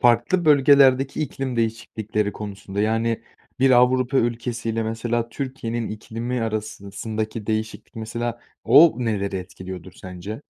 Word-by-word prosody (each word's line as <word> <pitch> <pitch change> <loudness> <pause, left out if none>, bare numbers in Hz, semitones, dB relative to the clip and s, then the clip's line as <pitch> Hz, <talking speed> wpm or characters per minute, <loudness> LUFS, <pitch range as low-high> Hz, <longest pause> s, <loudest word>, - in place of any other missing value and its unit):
farklı 120 +9 +3
bölgelerdeki 140 -2 +5
iklim 130 -3 -4
değişiklikleri 110 -2 -1
konusunda, 100 -1 -5
yani, 115 +1 0 0.4
bir 135 +1 +4
Avrupa 130 +1 +4
ülkesi 120 0 -1
ile, 115 0 -1
mesela, 115 +1 -2
Türkiye'nin 120 -3 -4
iklimi 115 +3 -4
arasındaki 110 0 -4
değişiklik, 110 +1 -3
mesela,o 120 +7 +3
neleri 100 -5 -1
etkiliyordur 95 0 -8
sence? 95 +8 -8
115 Hz, 110 wpm, -23 LUFS, 110-125 Hz, 0.4 s, bölgelerdeki